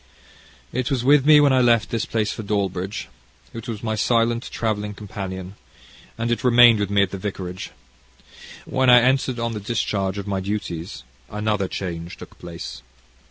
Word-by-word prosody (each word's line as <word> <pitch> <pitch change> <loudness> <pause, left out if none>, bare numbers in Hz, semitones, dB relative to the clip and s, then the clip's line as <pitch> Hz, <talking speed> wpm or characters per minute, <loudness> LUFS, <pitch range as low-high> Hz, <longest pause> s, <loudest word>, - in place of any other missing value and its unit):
"It 130 +1 -1
was 130 -4 0
with 140 +1 +4
me 150 -1 +8
when 145 -2 +4
I 130 - +4
left 115 -3 +3
this 115 -2 -1
place 110 -2 -1
for - - -6
Dawlbridge. 100 -1 -2 0.5
It 115 -1 -8
was 110 -2 -5
my 110 -1 -1
silent 115 +2 +1
travelling 105 -2 -2
companion, 95 -2 -7 0.6
and 115 +1 -1
it 120 - -1
remained 120 -2 +7
with 100 -2 -1
me 100 -1 +3
at 95 - -2
the 100 - -5
vicarage. 95 -2 -5 1.0
When 130 -1 +1
I 125 0 +9
entered 130 0 +1
on 115 0 -2
the 105 - -4
discharge 100 -3 -2
of 100 - -4
my 100 -2 -2
duties, 95 -7 -5 0.3
another 105 -2 -1
change 85 -3 -5
took - - -13
place. 85 -6 -8
105 Hz, 170 wpm, -22 LUFS, 95-120 Hz, 1.0 s, I